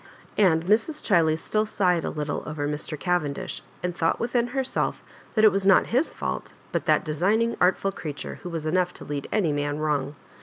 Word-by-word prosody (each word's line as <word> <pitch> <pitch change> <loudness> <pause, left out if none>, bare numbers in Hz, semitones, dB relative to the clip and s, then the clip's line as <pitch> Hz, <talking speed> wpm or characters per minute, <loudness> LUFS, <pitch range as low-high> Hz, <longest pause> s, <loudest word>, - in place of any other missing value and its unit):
And 170 -5 +4
Mrs. 225 - +1
Chiley 165 -6 +3
still 215 +6 -1
sighed 180 -5 +1
a - - -1
little 150 -1 -3
over 150 -1 -2
Mr. 150 +1 -4
Cavendish, 175 -6 -1 0.2
and 180 -1 -2
thought 165 -2 +1
within 240 0 +1
herself 265 +1 -1 0.3
that 220 -1 +5
it 215 - +8
was 195 0 0
not 190 - +6
his 270 +7 +2
fault, - - -4 0.2
but - - -2
that - - +3
designing, 205 +10 +1
artful 190 +2 +3
creature, 150 -6 -6
who 180 - -6
was 165 -2 -4
enough 180 +2 +1
to - - -10
lead 145 -1 -4
any 195 -8 +2
man 145 0 -1
wrong. 150 -2 -1
175 Hz, 190 wpm, -25 LUFS, 150-210 Hz, 0.3 s, it